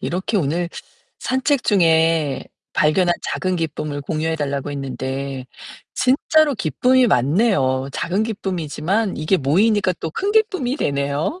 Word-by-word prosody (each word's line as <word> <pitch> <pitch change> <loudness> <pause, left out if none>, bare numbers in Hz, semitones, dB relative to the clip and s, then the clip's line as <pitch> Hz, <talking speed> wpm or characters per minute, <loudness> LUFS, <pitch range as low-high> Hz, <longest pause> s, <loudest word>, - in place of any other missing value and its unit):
이렇게 190 +5 -2
오늘 170 0 0 0.5
산책 265 +1 0
중에 165 -6 +2 0.3
발견한 175 +3 +3
작은 185 -1 -2
기쁨을 150 -3 -3
공유해 160 +3 -2
달라고 140 -2 -3
했는데, 135 -1 -4 0.5
진짜로 290 +3 +3
기쁨이 245 - +2
많네요. 135 - +2
작은 190 +5 -1
기쁨이지만 195 -1 -2
이게 155 +6 +1
모이니까 185 +7 +2
또 160 - -3
큰 400 - -2
기쁨이 375 - +1
되네요. 145 - -1
165 Hz, 295 characters per minute, -20 LUFS, 145-220 Hz, 0.5 s, 발견한